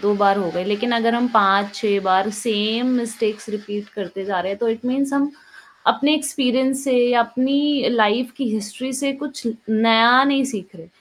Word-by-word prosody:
2 205 +1 +1
बार 200 -1 +3
हो 180 -4 -2
गई 180 +1 -2
लेकिन 210 +4 -1
अगर 230 0 +2
हम 240 +1 +1
5 200 -1 +3
6 200 -1 0
बार 190 +2 +2
सेम 220 +2 0
मिस्टेक्स 220 -2 -3
रिपीट 205 -1 -7
करते 195 -1 -7
जा 195 -2 -2
रहे 190 +2 -3
हैं, 200 - -7
तो 235 - -1
इट 225 +2 -3
मीन्स 275 +2 -1
हम। 280 +1 0 0.6
अपने 290 +2 +3
एक्सपीरियंस 270 -2 0
से 245 -2 +2
अपनी 270 +3 0
लाइफ़ 235 +3 +1
की 260 -3 -2
हिस्ट्री 220 +5 -5
से 280 -1 0
कुछ 285 -3 -8 0.2
नया 230 +3 +5
नहीं 275 -1 +2
सीख 190 -1 -8
रहे। 165 -1 -14
230 Hz, 185 wpm, -20 LUFS, 205-260 Hz, 0.6 s, नया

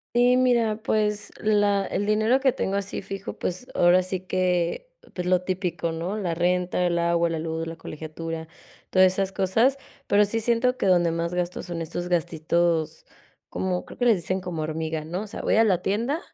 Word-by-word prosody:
Sí, 245 +1 +5
mira, 235 -4 +2
pues, 210 -2 0
la 205 -2 +2
el 205 - -2
dinero 215 +5 +3
que 265 -1 +3
tengo 195 -4 -2
así 195 -1 -4
fijo. 195 0 -6
Pues, 185 +8 -4
ahora 175 +1 +5
sí 185 0 -3
que, 185 - -1 0.2
pues, 180 -1 -4
lo 180 0 +2
típico, 180 -3 -2
¿no?, 170 +6 -3
la 180 -5 -1
renta, 180 +1 0
el 175 - 0
agua, 170 0 +2
la 165 - -2
luz, 160 0 -3
la 165 - -6
colegiatura, 160 +1 -6 0.4
todas 185 0 +5
esas 195 0 -1
cosas. 225 +9 +2 0.3
Pero, 205 +1 +4
sí 225 +3 -1
siento 235 +3 +1
que 195 - 0
donde 175 -2 +4
más 170 +1 -2
gastos 180 0 -3
son 170 -1 -4
estos 175 +2 -5
gastitos 165 -1 0 0.4
como 185 -1 -2
creo - - -13
que 245 - +1
les 230 - +6
dicen 185 +2 -2
como: 175 -4 -4
"Hormiga", 155 0 -3
¿no?, 175 +4 -4
o - - -8
sea, 205 - -7
voy - - +2
a 225 - +6
la 185 -5 +2
tienda 235 +10 0
185 Hz, 195 wpm, -25 LUFS, 170-210 Hz, 0.4 s, les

